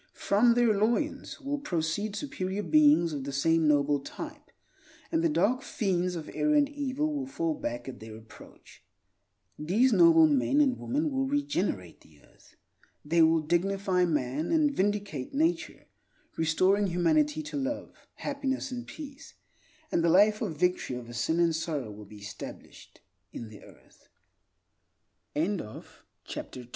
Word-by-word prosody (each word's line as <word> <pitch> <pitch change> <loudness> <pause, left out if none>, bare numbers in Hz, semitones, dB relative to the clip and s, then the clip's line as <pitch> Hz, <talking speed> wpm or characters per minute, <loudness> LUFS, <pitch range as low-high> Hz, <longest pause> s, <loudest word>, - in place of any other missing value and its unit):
From 230 +4 +3
their 240 -2 +4
loins 235 +13 -1
will 285 0 -3
proceed 195 - -2
superior 205 -5 -3
beings 295 - +4
of 140 -2 -4
the 140 - -5
same 160 +3 +2
noble 145 -1 +3
type; 300 - -9 0.6
and 325 0 +1
the 335 - +3
dark 255 -4 +1
fiends 180 -3 -1
of 160 -2 -6
error 300 0 +1
and 290 -1 +4
evil 290 +1 -2
will 280 -2 -3
fall 165 -11 -1
back 120 -3 -5
at 130 - -7
their 110 0 -10
approach. 110 0 -16 0.8
These 215 +12 +2
noble 330 -1 +7
men 290 -1 +2
and 270 -4 +2
women 295 +4 -1
will 270 0 0
regenerate 240 - -2
the 75 -2 -21
earth. - - -24 0.5
They 165 +3 +3
will 160 0 +5
dignify 185 +3 +1
man, 150 -1 -1
and 310 -3 +3
vindicate 200 - -2
nature, 325 +4 -1 0.5
restoring 185 +6 +2
humanity 300 - +1
to 295 - -7
love, 280 +1 -3 0.2
happiness, 275 -2 -3
and 245 -1 -6
peace; 285 -3 -10 0.6
and 170 - +1
the 170 - +3
life 210 +5 +5
of 155 - -3
victory 180 -7 0
over 120 -1 -8
sin 140 +8 0
and 170 -2 +3
sorrow 150 -8 -3
will 105 0 -11
be 105 +1 -13
established 100 0 -10 0.3
in 115 - -8
the 105 - -13
earth. - - -20 1.3
3. 150 - +2
Energy 185 - 0
and 195 - -3
Power 105 - -8 0.4
HOW - - -5
WOND 125 -1 -10
195 Hz, 155 wpm, -29 LUFS, -, 1.3 s, noble